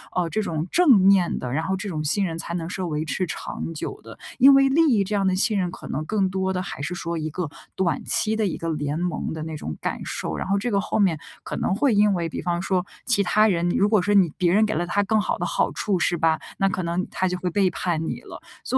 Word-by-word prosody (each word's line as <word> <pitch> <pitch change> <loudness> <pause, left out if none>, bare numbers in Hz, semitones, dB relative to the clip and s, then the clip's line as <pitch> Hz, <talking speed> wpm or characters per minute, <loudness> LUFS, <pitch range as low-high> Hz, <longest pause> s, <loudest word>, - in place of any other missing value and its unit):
呃， 175 -2 0
这 215 +7 -1
种 160 -2 -3
正 335 -8 +6
面 190 -2 +4
的， 125 - -4
然 155 +5 -1
后 190 - 0
这 195 +2 -5
种 155 -4 -3
信 180 +7 +1
任 165 -3 -2
才 170 +1 -5
能 170 -1 -3
是 185 - -4
维 155 -3 -2
持 185 +4 -1
长 165 0 -5
久 155 - -5
的， - - -11 0.2
因 275 +2 +8
为 275 0 +6
利 325 -3 +5
益 205 - +3
这 205 +2 -3
样 200 -1 +1
的 190 -1 +2
信 210 +2 +1
任 180 -2 -1
可 - - -10
能 150 +3 -3
更 195 0 0
多 190 0 -1
的 180 - -1
还 180 -6 -6
是 175 +5 -3
说 170 -1 -4
一 155 0 -3
个 175 -1 -3 0.3
短 185 -3 0
期 220 0 0
的 220 -1 0
一 185 - -2
个 165 - -4
联 150 -1 -2
盟 175 -3 -2
的 160 - -5
那 160 -1 -5
种 80 - -5
感 - - -3
受。 - - -4
然 - - -3
后 200 +1 +1
这 245 - -2
个 200 -3 +1
后 215 - -2
面 185 -6 +3 0.3
可 - - -5
能 - - 0
会 250 +2 +2
因 205 0 +4
为 170 -3 -1
比 - - -5
方 175 0 -1
说 185 -1 0 0.2
其 225 -5 +3
他 215 +3 +4
人， 175 -3 +1
如 195 +3 +2
果 215 -3 +4
说 205 +3 +1
你 190 -5 +5
别 175 -2 +2
人 215 +2 +4
给 215 - -2
了 175 - 0
他 200 +3 +1
更 220 +2 +2
好 - - -1
的 - - -1
好 - - 0
处 200 -3 -1
是 175 0 +1
吧， 160 -1 +2 0.2
那 195 - +2
可 185 -1 -2
能 170 +2 -2
他 185 - -1
就 180 0 -2
会 180 - -1
背 190 +1 +2
叛 165 -2 -2
你 - - -4
了。 - - -10 0.2
所 260 - 0
185 Hz, 305 characters per minute, -24 LUFS, 165-205 Hz, 0.3 s, 因